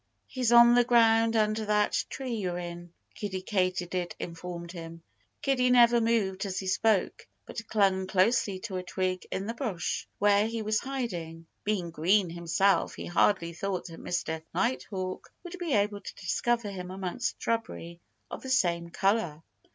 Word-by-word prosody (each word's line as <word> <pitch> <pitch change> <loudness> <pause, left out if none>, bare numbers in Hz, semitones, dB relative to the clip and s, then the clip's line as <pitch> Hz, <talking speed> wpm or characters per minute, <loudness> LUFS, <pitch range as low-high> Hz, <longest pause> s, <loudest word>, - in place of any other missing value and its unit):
"He's 250 -3 -1
on 235 0 +8
the 245 0 +6
ground, 230 -1 +4
under 215 0 +2
that 210 0 +1
tree 260 -3 -4
you're 185 -5 -2
in," 175 -1 -7 0.2
Kiddie 190 -3 -5
Katydid 185 -3 -1
informed 170 0 -6
him. 165 -1 -9 0.4
Kiddie 255 -2 +2
never 240 -1 +6
moved 215 -5 +1
as 185 - -4
he 190 - -3
spoke, 190 +1 +1 0.2
but 230 -2 -7
clung 195 -3 +2
closely 195 +1 +2
to 200 -5 -4
a - - -2
twig 185 0 -2
in 190 - -3
the 230 - -3
bush 225 - -3
where 205 +1 +4
he 225 -1 -3
was 215 0 +1
hiding. 175 -12 -5 0.2
Being 190 -5 -1
green 175 +3 +2
himself, 170 +2 +1
he - - -7
hardly 175 -1 +2
thought 185 +1 -3
that 165 - -10
Mr. 160 -2 -2
Nighthawk 195 -6 -2
would 355 0 -8
be 340 -5 -2
able 205 0 +1
to - - -9
discover 215 +3 -1
him 180 -2 -6
amongst 190 +6 -3
shrubbery 170 -7 -3 0.3
of - - -6
the 265 - -7
same 170 -9 +1
color. 185 -4 0
195 Hz, 160 wpm, -29 LUFS, 180-230 Hz, 0.4 s, on